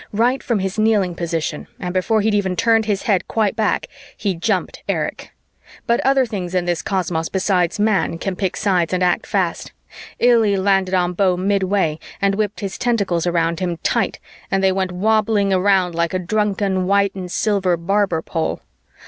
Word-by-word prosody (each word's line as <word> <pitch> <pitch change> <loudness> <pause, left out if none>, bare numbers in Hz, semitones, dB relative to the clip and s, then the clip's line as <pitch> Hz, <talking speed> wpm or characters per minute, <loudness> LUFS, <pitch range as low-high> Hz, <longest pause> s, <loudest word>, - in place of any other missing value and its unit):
Right 240 +5 +2
from 235 -5 0
his 195 +2 -3
kneeling 210 -5 +2
position 165 -3 -3
and 180 -1 -4
before 210 +4 +1
he'd 215 +1 +1
even 190 -3 0
turned 225 +2 +3
his 205 -2 -1
head 200 -4 +1
quite 220 -2 0
back, 220 -2 0 0.3
he 200 -3 -1
jumped 185 +3 -2
Erich. - - -2 0.6
But 235 - +2
other 270 -1 +3
things 185 -5 -5
in 180 -1 +1
this 175 -1 -1
cosmos 180 -5 -2
besides 185 -2 0
Man 210 -5 +1
can 190 +2 -3
pick 190 -1 -2
sides 185 -4 +1
and 185 0 +1
act 180 -1 +1
fast. - - -2 0.4
Illy 225 -5 +4
landed 190 -1 +2
on 180 -1 +1
Beau 185 0 +2
midway 190 -4 0 0.2
and 200 0 +2
whipped 210 +1 -2
his 195 -1 -5
tentacles 200 -8 0
around 170 -1 0
him 175 -2 -2
tight - - 0 0.3
and 195 0 0
they 190 - +4
went 190 -1 -1
wobbling 210 +1 +1
around 185 -1 +2
like 170 +1 -1
a - - +3
drunken 195 0 0
white 200 0 +2
and 185 -2 -6
silver 195 -5 +1
barber 180 -1 0
pole. 165 -1 -3
195 Hz, 175 wpm, -20 LUFS, 180-210 Hz, 0.6 s, Illy